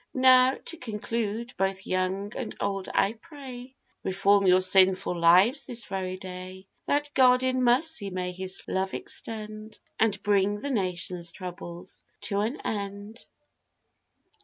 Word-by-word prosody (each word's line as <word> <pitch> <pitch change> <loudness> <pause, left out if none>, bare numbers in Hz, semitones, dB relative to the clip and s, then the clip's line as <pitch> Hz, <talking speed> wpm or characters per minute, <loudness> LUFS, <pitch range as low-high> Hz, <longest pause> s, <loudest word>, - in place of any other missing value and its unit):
Now, 255 0 +6
to 335 - -6
conclude, 230 0 -3
both 190 0 -1
young 185 +2 -1
and - - -5
old 195 -1 -2
I 200 +2 +2
pray, 260 -1 -11 0.3
Reform 195 +1 +3
your 185 0 +6
sinful 185 0 +3
lives 180 - +5
this 240 -3 -5
very 185 -1 -4
day, 185 0 -9 0.2
That 290 0 0
God 255 -1 +5
in 255 0 +1
mercy 250 -2 +2
may 180 -1 -3
his 185 +1 -5
love 190 0 -1
extend, 215 -1 -6 0.2
And 215 -2 +2
bring 205 0 +2
the 285 - -3
nation's 180 -5 -2
troubles 180 0 -9 0.2
to 200 -1 -1
an 225 +8 -1
end. 205 +2 -5
200 Hz, 135 wpm, -27 LUFS, 185-240 Hz, 0.3 s, Now